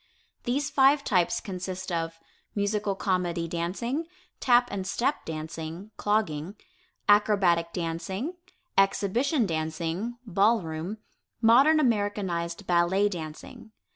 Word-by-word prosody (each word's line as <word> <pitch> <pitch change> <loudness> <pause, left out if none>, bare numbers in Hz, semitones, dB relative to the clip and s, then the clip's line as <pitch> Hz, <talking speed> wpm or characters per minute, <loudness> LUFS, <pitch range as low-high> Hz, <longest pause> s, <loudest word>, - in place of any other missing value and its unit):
These 285 +5 0
five 275 +1 +5
types 180 -8 +2
consist 185 -1 -5
of: 165 -1 -2 0.4
Musical 205 -1 0
Comedy 180 -3 -1
Dancing, 200 - -2 0.3
Tap 245 -1 +4
and 190 -2 -3
Step 255 +8 -1
Dancing 160 +4 -6
(Clogging), 195 -4 -1 0.5
Acrobatic 195 -5 +4
Dancing, 180 - -3 0.4
Exhibition 225 - +2
Dancing 165 +7 -3
(Ball 205 +1 +3
room), 160 +6 -5 0.4
Modern 265 +8 +6
Americanized 205 - 0
Ballet 180 +4 +3
Dancing. 165 +5 -8
195 Hz, 100 wpm, -27 LUFS, 170-225 Hz, 0.5 s, Modern